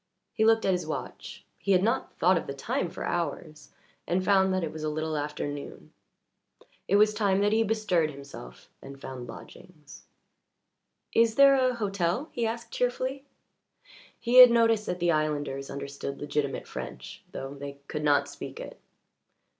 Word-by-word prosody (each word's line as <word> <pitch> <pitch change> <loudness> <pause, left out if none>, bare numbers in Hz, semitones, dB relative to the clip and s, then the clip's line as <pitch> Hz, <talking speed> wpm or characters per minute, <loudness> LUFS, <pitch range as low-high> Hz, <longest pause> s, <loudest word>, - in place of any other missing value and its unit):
He 220 - +1
looked 225 0 +4
at 190 - +3
his 180 -1 -1
watch - - -7
he 200 - +1
had 185 0 +3
not 230 +4 -1
thought 185 +3 +4
of 165 - -2
the 140 - -5
time 170 +5 -2
for - - -6
hours 155 -3 -4 0.4
and 185 +2 0
found 190 0 +4
that 185 -1 0
it 160 - -3
was 155 - -7
a 155 - -1
little 155 +1 -2
after 150 0 -3
noon. 145 0 -8 0.9
It 200 - +2
was 210 +1 +5
time 200 -3 +1
that 205 0 +2
he 225 - +3
bestirred 210 -7 +1
himself 140 - -11
and 135 0 -11
found 130 -2 -8
lodgings. 150 +5 -13 1.1
"Is 230 -1 +3
there 275 +1 +7
a 255 -2 +2
hotel?" 195 - -1
he 235 -1 -1
asked 230 +1 -5
cheerfully. 255 +2 -2 0.9
He 245 +1 +1
had 250 -1 +12
noticed 230 -2 +3
that 180 - -2
the 175 0 +2
islanders 145 -3 -1
understood 140 0 -6
legitimate 145 -1 -2
French, - - -8
though 135 +1 -6
they 140 0 -7
could 150 -1 -4
not 145 -1 +3
speak - - -8
it. - - -9
180 Hz, 170 wpm, -28 LUFS, 145-220 Hz, 1.1 s, had